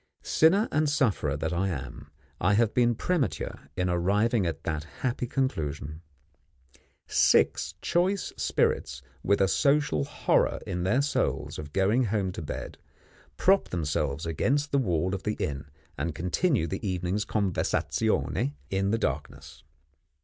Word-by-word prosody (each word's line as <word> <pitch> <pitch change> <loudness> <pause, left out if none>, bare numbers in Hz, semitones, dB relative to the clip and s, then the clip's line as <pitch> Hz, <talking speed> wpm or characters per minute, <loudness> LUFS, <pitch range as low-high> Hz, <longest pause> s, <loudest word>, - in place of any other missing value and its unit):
Sinner 190 +8 +4
and 155 0 +2
sufferer 110 - +1
that 80 +3 -2
I 90 +3 0
am, 65 -7 -6 0.3
I 100 +4 +3
have 115 0 +2
been 120 -1 +3
premature 150 - -2
in 90 - +1
arriving 100 +4 +2
at 85 - -4
that 75 -2 -2 0.2
happy 125 -1 -1
conclusion! 80 - -2 1.0
Six - - +3
choice 185 +3 +1
spirits, - - 0 0.2
with 100 +1 +2
a 95 - +4
social 140 - +2
horror - - +1
in 90 - -3
their 125 +9 +2
souls 145 - -1
of 75 -1 -7
going 105 - +2
home 100 -3 0
to 90 - -6
bed, 75 - -6 0.6
prop 195 +1 +3
themselves 75 -2 -1
against 140 - 0
the 140 - +3
wall 90 -5 0
of 95 - -3
the 105 +1 -2
inn, 70 -1 -3 0.3
and 80 +2 -2
continue 105 - +1
the 95 +3 -4
evening's 95 +1 -1
conversazione 95 -7 0 0.2
in 95 +1 +1
the 115 - +2
darkness. 75 -9 -4
95 Hz, 140 wpm, -28 LUFS, 80-125 Hz, 1.0 s, Sinner